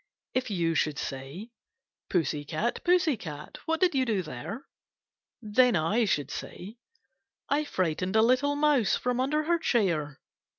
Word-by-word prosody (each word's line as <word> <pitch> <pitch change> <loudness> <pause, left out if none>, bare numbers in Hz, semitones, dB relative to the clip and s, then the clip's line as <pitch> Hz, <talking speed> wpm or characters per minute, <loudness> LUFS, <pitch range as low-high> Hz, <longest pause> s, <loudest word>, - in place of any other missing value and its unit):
If 255 -2 -1
you 170 -5 0
should 155 -3 0
say: 140 - -6 0.3
' - - -64
Pussy 150 -4 0
cat, 165 +11 -2
pussy 350 -4 +3
cat, 150 -5 -8
What 325 0 +1
did 365 -3 +3
you 235 -8 +1
there? 165 - -7 0.4
' - - -66 0.2
Then 250 -3 +6
I 195 +9 +2
should 145 -8 0
say: 205 +6 -7 0.2
— 265 0 -50
* - - -55
I 295 +2 +1
frightened 185 - -1
a 220 - +6
little 255 +5 +3
mouse 290 -7 +3
From 250 0 -1
under 300 +4 +1
her 340 +2 +1
chair.' 170 - 0
220 Hz, 165 wpm, -28 LUFS, 165-270 Hz, 0.4 s, Then